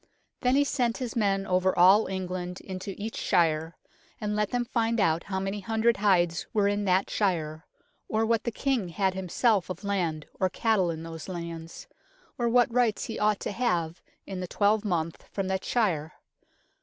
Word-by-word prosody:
Then 250 Hz, +1 st, +2 dB
he 285 Hz, -, +5 dB
sent 245 Hz, -5 st, 0 dB
his 245 Hz, -4 st, -4 dB
men 195 Hz, -3 st, +1 dB
over 185 Hz, 0 st, +1 dB
all 190 Hz, +5 st, +6 dB
England 185 Hz, -1 st, -4 dB
into 190 Hz, 0 st, -6 dB
each 220 Hz, +2 st, -5 dB
shire, 165 Hz, -3 st, +1 dB, 0.4 s
and 210 Hz, 0 st, -2 dB
let 210 Hz, -1 st, 0 dB
them 245 Hz, -1 st, -1 dB
find 230 Hz, -1 st, 0 dB
out 165 Hz, -4 st, +2 dB
how 190 Hz, -1 st, -2 dB
many 195 Hz, +2 st, -3 dB
hundred 225 Hz, +3 st, +1 dB
hides 175 Hz, -4 st, +2 dB
were 205 Hz, -2 st, +3 dB
in 205 Hz, 0 st, 0 dB
that 185 Hz, 0 st, +2 dB
shire, 160 Hz, -5 st, -1 dB, 0.4 s
or 220 Hz, +1 st, +1 dB
what 230 Hz, -1 st, +1 dB
the 235 Hz, -, -1 dB
King 245 Hz, -6 st, -1 dB
had 190 Hz, +2 st, 0 dB
himself 190 Hz, +1 st, +1 dB
of 185 Hz, -, -6 dB
land 175 Hz, -7 st, -1 dB
or 185 Hz, -, +2 dB
cattle 205 Hz, -2 st, +1 dB
in 160 Hz, -1 st, -4 dB
those 165 Hz, +1 st, -8 dB
lands, 170 Hz, -2 st, -7 dB, 0.5 s
or 240 Hz, -1 st, +2 dB
what 240 Hz, 0 st, +3 dB
rights 240 Hz, -4 st, +2 dB
he 225 Hz, -, -5 dB
ought 210 Hz, -1 st, +2 dB
to -, -, -3 dB
have 175 Hz, -8 st, -1 dB, 0.2 s
in 190 Hz, -2 st, -5 dB
the 180 Hz, -, -4 dB
twelve 205 Hz, +3 st, +2 dB
month 170 Hz, -5 st, -2 dB
from 195 Hz, -2 st, -2 dB
that 190 Hz, 0 st, -1 dB
shire. 165 Hz, -10 st, 0 dB
195 Hz, 180 wpm, -28 LUFS, 175-220 Hz, 0.5 s, all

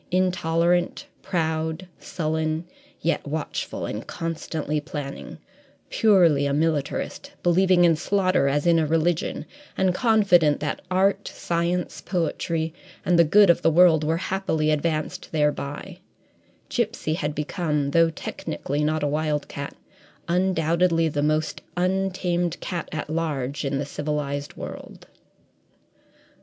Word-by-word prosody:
Intolerant, 175 Hz, -1 st, +1 dB, 0.2 s
proud, 160 Hz, +1 st, -2 dB
sullen, 160 Hz, 0 st, -2 dB, 0.4 s
yet 170 Hz, -, 0 dB
watchful 155 Hz, +1 st, -3 dB
and -, -, -5 dB
constantly 155 Hz, -2 st, -3 dB
planning 145 Hz, -2 st, -7 dB, 0.5 s
purely 170 Hz, -10 st, +4 dB
a 140 Hz, -, 0 dB
militarist, 160 Hz, -, -1 dB
believing 180 Hz, 0 st, +4 dB
in 165 Hz, -1 st, +5 dB
slaughter 185 Hz, -3 st, +1 dB
as 145 Hz, +3 st, +1 dB
in 170 Hz, -1 st, +5 dB
a 155 Hz, -, +1 dB
religion, 165 Hz, +1 st, 0 dB, 0.3 s
and 190 Hz, -1 st, +2 dB
confident 180 Hz, -, +4 dB
that 150 Hz, -, -3 dB
art, 195 Hz, +2 st, +2 dB
science, 170 Hz, +1 st, -2 dB
poetry, 165 Hz, -2 st, -2 dB, 0.3 s
and 175 Hz, -1 st, +3 dB
the -, -, +8 dB
good 195 Hz, +4 st, +6 dB
of -, -, 0 dB
the -, -, +4 dB
world 165 Hz, -1 st, +5 dB
were 160 Hz, +2 st, +1 dB
happily 170 Hz, -4 st, 0 dB
advanced 155 Hz, 0 st, -2 dB
thereby 150 Hz, +3 st, -2 dB, 0.7 s
Gipsy 230 Hz, -10 st, -1 dB
had 150 Hz, -2 st, -2 dB
become, 150 Hz, -2 st, -1 dB
though 165 Hz, +2 st, +4 dB
technically 150 Hz, -2 st, -4 dB
not 155 Hz, 0 st, 0 dB
a -, -, +2 dB
wildcat, 150 Hz, -1 st, -2 dB, 0.5 s
undoubtedly 170 Hz, -2 st, +2 dB
the 145 Hz, -1 st, -1 dB
most 155 Hz, +1 st, 0 dB, 0.2 s
untamed 180 Hz, -2 st, 0 dB
cat 175 Hz, -3 st, -4 dB
at 155 Hz, -, -4 dB
large 150 Hz, -4 st, -2 dB
in 140 Hz, -1 st, -1 dB
the 140 Hz, -, -2 dB
civilized 145 Hz, -1 st, -3 dB
world. -, -, -9 dB
165 Hz, 120 wpm, -24 LUFS, 150-180 Hz, 0.7 s, the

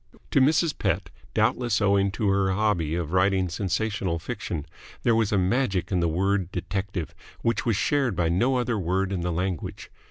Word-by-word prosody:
To 140 Hz, -, +4 dB
Mrs. 155 Hz, +3 st, +3 dB
Pett, 90 Hz, -3 st, -1 dB, 0.2 s
doubtless 120 Hz, -4 st, +2 dB
owing 100 Hz, -1 st, +3 dB
to 105 Hz, 0 st, -1 dB
her 95 Hz, -1 st, +2 dB
hobby 95 Hz, -6 st, +1 dB
of 85 Hz, -1 st, -3 dB
writing 95 Hz, 0 st, +2 dB
sensational 95 Hz, 0 st, -1 dB
fiction, 75 Hz, -2 st, -5 dB, 0.4 s
there 120 Hz, -, +4 dB
was 110 Hz, -2 st, +2 dB
a 100 Hz, -, +2 dB
magic 95 Hz, -2 st, +1 dB
in 90 Hz, -, +2 dB
the 85 Hz, -, +2 dB
word 95 Hz, +2 st, 0 dB
detective 95 Hz, -4 st, -3 dB, 0.3 s
which 115 Hz, 0 st, 0 dB
was 115 Hz, -, +3 dB
shared 135 Hz, 0 st, +1 dB
by 85 Hz, -1 st, +1 dB
no 115 Hz, +11 st, +2 dB
other 120 Hz, -3 st, 0 dB
word 95 Hz, +2 st, 0 dB
in 95 Hz, -3 st, -1 dB
the 90 Hz, +1 st, -1 dB
language. 90 Hz, 0 st, -3 dB
95 Hz, 180 wpm, -26 LUFS, 90-110 Hz, 0.4 s, To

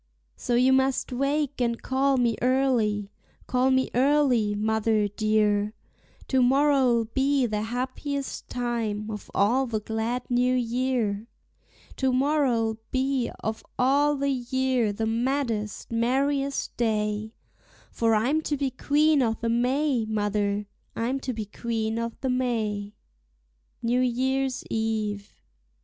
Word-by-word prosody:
So 240 Hz, -, -1 dB
you 255 Hz, +2 st, +4 dB
must 265 Hz, 0 st, +1 dB
wake 280 Hz, +1 st, -1 dB
and 235 Hz, -1 st, 0 dB
call 270 Hz, +1 st, +1 dB
me 235 Hz, -2 st, +2 dB
early, 240 Hz, -6 st, +1 dB, 0.3 s
call 255 Hz, +1 st, +2 dB
me 260 Hz, 0 st, +2 dB
early, 255 Hz, -5 st, +3 dB
mother 220 Hz, 0 st, +1 dB
dear; 210 Hz, 0 st, +1 dB, 0.5 s
To 260 Hz, -1 st, +2 dB
morrow'll 260 Hz, -3 st, +3 dB
be 270 Hz, +3 st, +1 dB
the 210 Hz, -2 st, -1 dB
happiest 260 Hz, +4 st, -4 dB
time 225 Hz, -3 st, -2 dB
of 210 Hz, -2 st, -7 dB
all 245 Hz, +7 st, +3 dB
the 220 Hz, -2 st, -1 dB
glad 225 Hz, +4 st, -2 dB
new 250 Hz, +1 st, +2 dB
year; 240 Hz, -3 st, -1 dB, 0.7 s
To 265 Hz, -1 st, +1 dB
morrow'll 255 Hz, -5 st, +1 dB
be 265 Hz, -1 st, 0 dB
of 220 Hz, 0 st, -3 dB
all 285 Hz, +3 st, +3 dB
the 280 Hz, 0 st, 0 dB
year 255 Hz, -2 st, 0 dB
the 220 Hz, +2 st, -2 dB
maddest, 230 Hz, -3 st, -2 dB
merriest 275 Hz, +4 st, 0 dB
day, 215 Hz, -1 st, -1 dB, 0.6 s
For 225 Hz, -1 st, +2 dB
I'm 265 Hz, +9 st, +2 dB
to 295 Hz, -2 st, -2 dB
be 275 Hz, -1 st, -1 dB
Queen 295 Hz, +3 st, +2 dB
o'the 230 Hz, -1 st, 0 dB
May, 250 Hz, +1 st, +1 dB
mother, 205 Hz, -1 st, -1 dB, 0.3 s
I'm 250 Hz, +4 st, -1 dB
to 265 Hz, -, -3 dB
be 220 Hz, -3 st, -4 dB
Queen 225 Hz, +1 st, -3 dB
o'the 230 Hz, +3 st, -4 dB
May. 220 Hz, -5 st, -1 dB, 0.9 s
NEW 240 Hz, +2 st, +2 dB
YEAR'S 260 Hz, +1 st, 0 dB
EVE. 215 Hz, -2 st, -2 dB
245 Hz, 125 wpm, -26 LUFS, 220-265 Hz, 0.9 s, you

